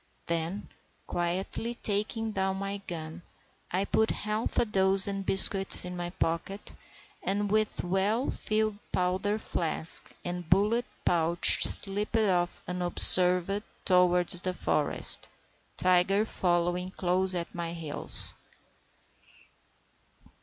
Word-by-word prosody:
Then, 170 +4 -4 0.4
quietly 185 +7 -4
taking 220 +1 -2
down 190 -1 -2
my 195 +1 -5
gun, 160 0 -7 0.5
I 190 +3 -1
put 220 +2 0
half 215 +2 -3
a - - +2
dozen 195 -1 +3
biscuits 195 0 +6
in 180 0 -7
my 175 0 -5
pocket, 175 +3 -4 0.5
and, 205 +1 -2
with 215 0 -1
well 195 +7 -1
filled 215 -1 -2
powder 185 +3 -1
flask 165 -6 -2
and 175 -2 -6
bullet 210 +6 +1 0.2
pouch, 170 0 +3
slipped 205 +3 0
off 180 -5 -1
unobserved 180 +2 +4 0.2
towards 180 -1 +3
the 185 -1 -3
forest, - - -1 0.5
Tiger 185 +3 +2
following 175 -2 -1
close 185 0 +1
at 170 -1 -5
my 170 -1 -5
heels. 165 -3 0
185 Hz, 105 wpm, -28 LUFS, 175-205 Hz, 0.5 s, biscuits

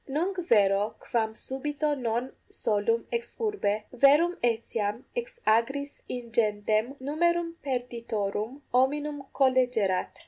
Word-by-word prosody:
Nunc 355 +7 -1
vero 205 -1 +4
quam 220 -2 -1
subito 295 +5 -2
non 245 0 -2 0.2
solum 220 +2 0
ex 235 0 -3
urbe, 405 - 0
verum 290 +7 +5
etiam 225 -1 -1
ex 485 0 -4
agris 270 +6 +1
ingentem 220 0 0
numerum 335 +5 +1
perditorum 235 -1 -3
hominum 285 +2 +1
collegerat! 250 -8 +2
250 Hz, 100 wpm, -28 LUFS, 220-290 Hz, 0.2 s, verum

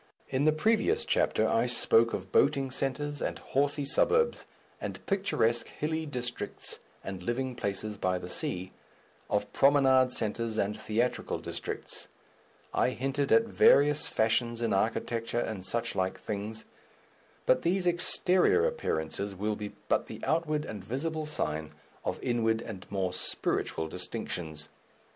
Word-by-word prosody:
In 135 +2 +1
the 155 - +6
previous 225 - +2
chapter - - +2
I - - +2
spoke 450 -1 +4
of - - -5
boating 140 - +3
centres 145 +2 -2
and - - -2
horsey 145 +1 0
suburbs, 470 - +2 0.3
and - - -6
picturesque 155 - +1
hilly 160 +1 -3
districts 125 -3 -4 0.2
and 95 -1 -6
living 125 +6 -2
places 105 -2 -3
by 90 -1 0
the 90 - -7
sea, 90 +1 -2 0.6
of - - -1
promenade 135 -2 +5
centres 110 0 -1
and 105 0 0
theatrical 110 +3 -1
districts; - - -5 0.7
I - - +3
hinted 135 +2 -1
at 230 - +7
various 150 -9 +4
fashions 115 +1 +1
in 115 -3 +1
architecture, 115 +3 0
and 110 -5 -3
suchlike 95 -3 -1
things, 105 +1 -5 0.8
but - - +4
these 180 +2 +1
exterior 180 - +3
appearances 100 - -2
will 105 +3 -1
be 105 0 -6
but - - +1
the - - -8
outward 155 -2 0
and 105 -3 -7
visible 155 +8 -2
sign 75 - -2 0.3
of - - -2
inward 115 -2 +1
and 95 -5 -8
more 95 -2 -1
spiritual 80 -2 -1
distinctions. 85 -4 -4
120 Hz, 135 wpm, -30 LUFS, 105-150 Hz, 0.8 s, at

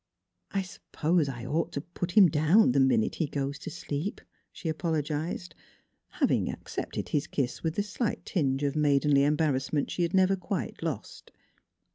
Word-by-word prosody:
" - - -54
I 195 -1 0
suppose 170 -3 -1
I 120 -3 -6
ought 155 +6 -1
to 140 - -2
put 175 +2 -5
him 205 -4 +8
down 155 - +4
the 135 - +2
minute 130 -5 +3
he 160 - 0
goes 140 0 -3
to - - -6
sleep," 155 +8 -4 0.3
she - - -7
apologized 160 +1 -2 0.6
having - - +1
ac - - -3
cepted - - -4
his 145 - 0
kiss 130 -3 -2
with 160 -1 -2
the 205 - +1
slight 210 +3 -3
tinge 140 -6 0
of 140 0 0
maidenly 145 -1 +3
embarrassment 145 -1 +1
she - - -2
had 170 +2 +1
never 190 +1 +4
quite 190 +1 -4
lost. - - -5
155 Hz, 170 wpm, -29 LUFS, 140-175 Hz, 0.6 s, him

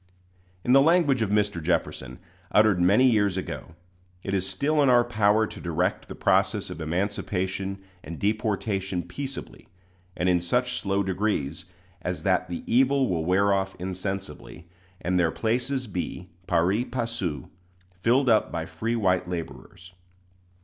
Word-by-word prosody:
In 125 - +3
the 135 - +8
language 150 -5 +3
of 110 - +1
Mr. 105 -4 +1
Jefferson, 65 -6 -2 0.3
uttered 105 -4 +4
many 100 +9 +5
years 105 -5 +2
ago, 85 -3 -6 0.5
"It 95 - -3
is 95 -1 0
still 145 +11 +1
in 140 - +4
our 120 -1 +6
power 110 -2 +2
to - - -9
direct 85 -3 -1
the - - -8
process - - +1
of - - -7
emancipation 95 +2 -2 0.2
and 85 - -7
deportation 100 -3 -1
peaceably, 140 -2 -7 0.5
and 90 - 0
in 90 -1 +3
such 125 +7 0
slow 100 0 0
degrees, 95 -6 -2 0.4
as 90 0 -4
that 90 -2 +1
the 85 - -5
evil 135 +2 +3
will 80 -3 -1
wear 100 +3 +3
off 95 0 -1
insensibly; 95 -1 -6 0.3
and 90 +1 +1
their 85 -2 +3
places 125 +7 -1
be, 90 -3 -5 0.2
pari 90 +6 +2
passu, 115 - -3 0.5
filled 125 +7 +3
up 110 -3 +3
by 80 -1 -3
free 115 +7 -3
white 90 -5 +1
laborers. 90 +1 -7
100 Hz, 145 wpm, -26 LUFS, 90-115 Hz, 0.5 s, the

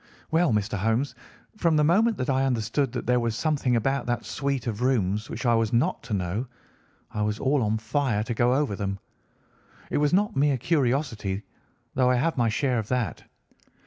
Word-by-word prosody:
"Well, 165 -1 +3
Mr. 105 -1 0
Holmes, 115 +7 0 0.4
from 170 -5 +2
the 150 - +4
moment 215 +9 +3
that 125 - -2
I 135 0 +2
understood 120 +1 0
that 125 - -4
there 125 0 +3
was 115 -2 -1
something 140 -4 +1
about 135 +4 0
that 120 -1 -1
suite 140 -3 -2
of 115 -1 -3
rooms 105 -5 +1
which 120 - -5
I 120 - +4
was 115 -2 +1
not 135 +10 +1
to 115 -2 -6
know, 95 +7 -2 0.6
I 105 - -3
was 105 0 0
all 135 +2 +1
on 110 0 +1
fire 115 -1 0
to 120 - -3
go 120 +2 +2
over 140 -7 0
them. 100 -1 -3 0.9
It - - +1
was 145 0 +2
not 205 +1 +2
mere 140 0 +3
curiosity, 125 - 0 0.5
though 130 -1 +3
I 125 - +4
have 160 +7 +1
my 120 -3 +2
share 125 +2 0
of 110 - -5
that. 125 -3 -2
125 Hz, 195 wpm, -26 LUFS, 110-140 Hz, 0.9 s, the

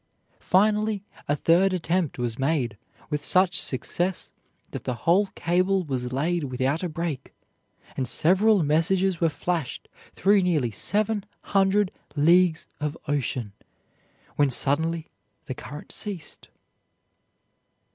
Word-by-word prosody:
Finally 210 +1 +2 0.2
a 145 - +2
third 175 +6 +3
attempt 175 -2 -1
was 120 -1 -3
made, 135 -6 0 0.4
with 150 -1 -1
such 185 +1 +3
success 175 +7 -2 0.4
that - - -6
the 125 - -2
whole 190 +5 +4
cable 185 +3 +1
was 125 -5 -3
laid 160 +4 0
without 130 +4 -1
a 180 - -2
break, 165 -3 -4 0.6
and 130 - -2
several 190 - +3
messages 175 +4 +1
were 165 - +4
flashed 160 -1 -3 0.3
through 200 +2 +4
nearly 155 -10 +1
seven 210 - 0 0.2
hundred 195 0 +2 0.2
leagues 170 +2 +4
of 150 +1 -3
ocean, 125 -7 -2 0.8
when 145 -1 +4
suddenly 160 +5 +1 0.3
the 130 - -4
current 145 +3 -9
ceased. 190 -8 -5
165 Hz, 115 wpm, -25 LUFS, 145-190 Hz, 0.8 s, whole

